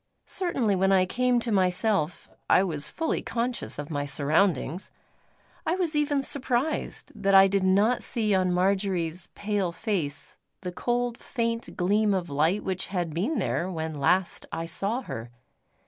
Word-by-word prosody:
Certainly, 265 - 0
when 195 +1 +3
I 185 -1 +4
came 250 +5 +1
to 230 - -3
myself 185 -3 +1 0.2
I 185 - +5
was 155 -6 -3
fully 325 -1 -2
conscious 240 +1 -2
of 145 +2 -6
my 145 -1 -1
surroundings. 150 +3 +1 0.7
I 330 - 0
was 345 -4 -1
even 290 -2 +1
surprised 270 +2 0
that 200 -3 +1
I 195 0 +9
did 195 0 0
not 200 +6 +3
see 215 -3 0
on 185 -1 +2
Marjory's 180 -2 0
pale 205 -4 -1
face, 170 -7 -3 0.2
the 180 -1 -4
cold 240 +4 -1
faint 230 -2 -3
gleam 205 +3 +2
of 175 -4 -3
light 160 +8 +1
which 190 -1 -2
had 175 -4 -2
been 215 - -1
there 180 - -1
when 160 -3 -4
last 180 +6 +1
I 165 - -3
saw 200 +9 -1
her. 115 - -6
195 Hz, 155 wpm, -27 LUFS, 175-230 Hz, 0.7 s, I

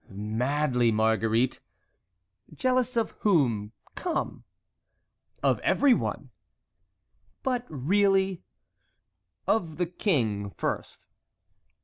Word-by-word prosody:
"Madly, 120 +5 0
Marguerite." 110 +2 +2 0.9
"Jealous 255 -1 0
of 230 - +1
whom? 120 - +2 0.2
Come!" 350 -2 -3 1.0
"Of - - +3
everyone." 280 -4 +2 1.1
"But 250 -2 -1
really?" 190 +5 +2 1.0
"Of 165 -8 0
the 180 - +1
king 120 - 0
first." - - -4
150 Hz, 70 wpm, -27 LUFS, -, 1.1 s, Of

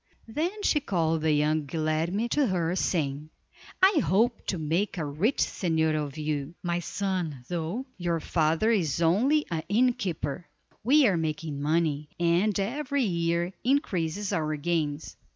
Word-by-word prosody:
Then 345 - -3
she 300 - +3
called 165 - 0
the 160 0 +2
young 150 0 +1
Guilerme 160 +8 -1
to 285 +1 +2
her, 175 -3 0
saying: 150 -5 -1 0.5
"I 380 -4 +6
hope 225 +5 +1
to 185 - -1
make 165 +6 -1
a 160 - -2
rich 160 - 0
señor 160 -3 +1
of 145 0 -7
you, 150 0 -3
my 175 -1 0
son, 175 -8 -3
though 175 +9 -3
your 170 -1 0
father 160 +7 +1
is 170 -10 +1
only 240 - +3
an 165 -1 -1
innkeeper. 190 - 0 0.4
We 280 +5 +5
are 195 -6 +3
making 155 -2 -3
money, 150 -1 0
and 175 +5 +2
every 275 +6 -1
year 170 -2 0
increases 205 - 0
our 155 -1 0
gains. 150 -1 -2
170 Hz, 145 wpm, -27 LUFS, 155-210 Hz, 0.5 s, I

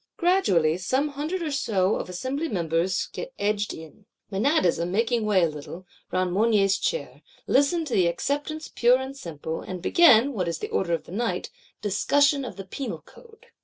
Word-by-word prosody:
Gradually 190 - +2
some 265 +10 0
hundred 305 +6 -3
or 310 - -2
so 205 -8 +1
of - - -5
Assembly 260 - -3
members 170 0 0
get - - -7
edged 210 0 0
in, 160 +6 -12 0.2
Menadism 195 - +1
making 225 +3 0
way 195 -4 +3
a - - +4
little, 155 +4 -8 0.3
round 185 -1 0
Mounier's 200 -2 +3
Chair; 475 +2 -3 0.2
listen 315 +4 +2
to 270 - -5
the 180 -3 +3
Acceptance 290 - -2
pure 245 +1 +3
and 265 +1 -6
simple; 160 - -6
and 185 -1 -6
begin, 275 - +5
what 185 -6 -2
is 170 -1 -2
the - - -5
order 170 -3 0
of 165 -2 -1
the - - -14
night, 230 +5 -2 0.3
"discussion 285 +7 +2
of 250 - -6
the 195 - -8
Penal 265 +8 -6
Code." 460 0 -18
215 Hz, 175 wpm, -25 LUFS, 180-285 Hz, 0.3 s, begin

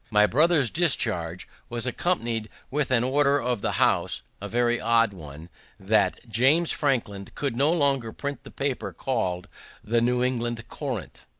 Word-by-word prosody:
My 105 -1 +5
brother's 150 +1 +3
discharge 110 - +2 0.2
was 120 0 -3
accompany'd 120 -6 -1 0.2
with 145 0 0
an 125 -2 +2
order 140 +2 +2
of 125 -4 -1
the - - -1
House - - +1 0.2
(a 100 - -4
very 120 +2 +1
odd 115 -1 +2
one), 80 -2 -11 0.3
that 105 +4 +1
"James 135 +10 +3
Franklin 115 -9 -1
should 140 -5 -1
no 140 +5 +3
longer 140 -8 +1
print 140 +1 -6
the - - -11
paper 125 -9 -3
called 90 -4 -2 0.4
the 115 +2 +1
New 125 +1 +1
England 120 -2 -2
Courant." 130 - -6
120 Hz, 155 wpm, -25 LUFS, 110-140 Hz, 0.4 s, My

